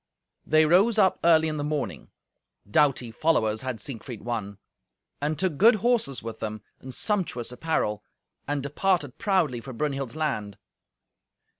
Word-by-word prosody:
They 155 +1 +5
rose 195 +8 +4
up 190 -3 +4
early 160 -1 +5
in 155 -1 -2
the 145 - -2
morning 140 - -3 0.6
(doughty 125 0 +2
followers 110 -6 +1
had 130 -3 -4
Siegfried 120 -4 -8
won!), 105 -4 -4 0.6
and 150 +1 -1
took 170 -2 -1
good 225 - +7
horses 215 - 0
with 115 -1 -6
them, 110 -2 -5 0.2
and 130 - -9
sumptuous 130 - -1
apparel, 125 -6 -1 0.4
and 145 -1 -1
departed 150 -1 0
proudly 170 - +1
for 130 +2 -8
Brunhild's 135 0 -3
land. 130 -11 -2
145 Hz, 140 wpm, -26 LUFS, 115-165 Hz, 0.6 s, good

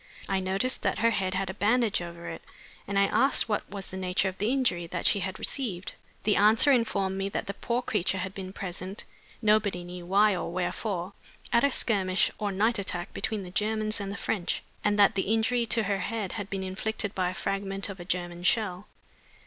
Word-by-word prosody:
I 195 -1 +1
noticed 195 +7 0
that - - 0
her 230 0 +3
head 190 -3 -1
had 190 0 -1
a - - -9
bandage 220 0 +2
over 170 0 -7
it, - - -6 0.5
and 200 - -1
I 200 - +6
asked 270 +8 +4
what 210 -2 -1
was 195 -1 -7
the 190 - -6
nature 185 +1 +1
of 185 - -11
the 210 +3 +1
injury 245 -11 +1
that - - -4
she 205 - +4
had 190 0 -3
received. 205 -10 -3 0.3
The 210 - +3
answer 220 +7 +6
informed 200 -6 +1
me 195 0 -1
that - - -3
the 200 - -4
poor 235 +4 -2
creature 190 -4 0
had 190 0 -3
been 190 -1 -6
present, 190 +1 -6 0.4
nobody 210 -4 +3
knew 175 0 -8
why 205 +2 +4
or 175 - -3
wherefore, 185 +1 -2 0.4
at 235 - +5
a 280 - +4
skirmish 190 -7 +2
or 205 -1 -1
night 215 +4 +2
attack 180 -1 -3
between 215 -3 -2
the 180 - -8
Germans 215 +1 +1
and 195 0 -4
the 200 - -5
French, 190 -6 -1 0.2
and 205 0 +2
that 205 +1 +6
the 195 0 -1
injury 230 +2 +2
to 225 0 +2
her 200 -1 0
head 210 0 -2
had 205 -2 -5
been 195 -1 -3
inflicted 205 +2 -3
by 185 -1 0
a 185 - -6
fragment 195 0 -2
of 195 -2 -7
a - - -6
German 175 -1 -2
shell. 185 0 +1
195 Hz, 215 wpm, -28 LUFS, 185-215 Hz, 0.5 s, I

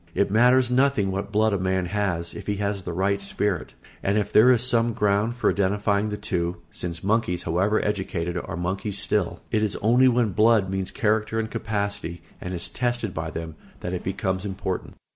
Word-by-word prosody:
It 100 - +1
matters 125 +3 +4
nothing 130 -6 +2
what 100 +1 -4
blood 110 0 +2
a 100 - 0
man 95 0 0
has, 90 -4 -2
if 105 - -9
he 105 - 0
has 100 0 -2
the 90 - -5
right 100 +3 0
spirit; 100 -2 -2 0.3
and 100 +2 +1
if 105 - -1
there 120 +4 +7
is 120 -2 +3
some 120 -2 +2
ground 105 +3 +1
for 120 - +2
identifying 100 +2 +1
the 105 - -3
two 90 -4 -2
(since 85 -2 -4
monkeys, 100 -4 0
however 95 +6 +1
educated, 95 -4 -2
are 90 0 -4
monkeys 95 +3 -2
still) - - 0
it 110 - +2
is 105 -2 0
only 120 +5 +4
when 120 -4 +2
blood 110 -1 +3
means 95 -1 -2
character 110 -2 0
and 110 0 -3
capacity, 100 -5 -3 0.2
and 90 0 -4
is 85 - +1
tested 120 -5 -2
by 80 0 -3
them, 80 0 -6 0.3
that 90 - -4
it 90 - -2
becomes 95 0 -2
important. 95 -2 -4
100 Hz, 195 wpm, -25 LUFS, 95-110 Hz, 0.3 s, there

